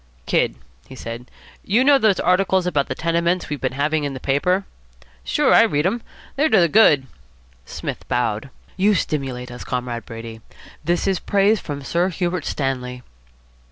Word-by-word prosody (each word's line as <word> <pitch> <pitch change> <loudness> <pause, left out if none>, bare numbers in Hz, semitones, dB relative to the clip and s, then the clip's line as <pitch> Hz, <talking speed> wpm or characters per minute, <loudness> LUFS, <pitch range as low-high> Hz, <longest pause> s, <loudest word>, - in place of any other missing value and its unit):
"Kid," - - +1 0.3
he - - -11
said, 115 0 -7 0.3
"you 225 +6 +2
know 280 0 +5
those 215 -5 +3
articles 185 +1 +2
about 150 -6 0
the - - -3
tenements 170 +2 0
we've 145 -1 -4
been 130 -1 -1
having 150 +3 0
in 140 -1 -3
the - - -6
paper?" 180 +10 +1 0.6
"Sure. - - +2
I - - +8
read 150 +2 +2
'em. 230 +5 0 0.3
They're 300 +3 +2
to - - +5
the 170 - +5
good." 150 -8 +5 0.6
Psmith - - -6
bowed. 120 +1 -1 0.3
"You 200 +2 +3
stimulate 130 -7 -3
us, 125 - -8
Comrade 125 -2 -4
Brady. 115 0 -8 0.4
This 175 +2 0
is 195 -2 +1
praise 205 +2 +2
from 145 -2 -6
Sir 175 +6 0
Hubert 175 -3 -2
Stanley." 125 -2 -3
155 Hz, 165 wpm, -21 LUFS, 130-185 Hz, 0.6 s, I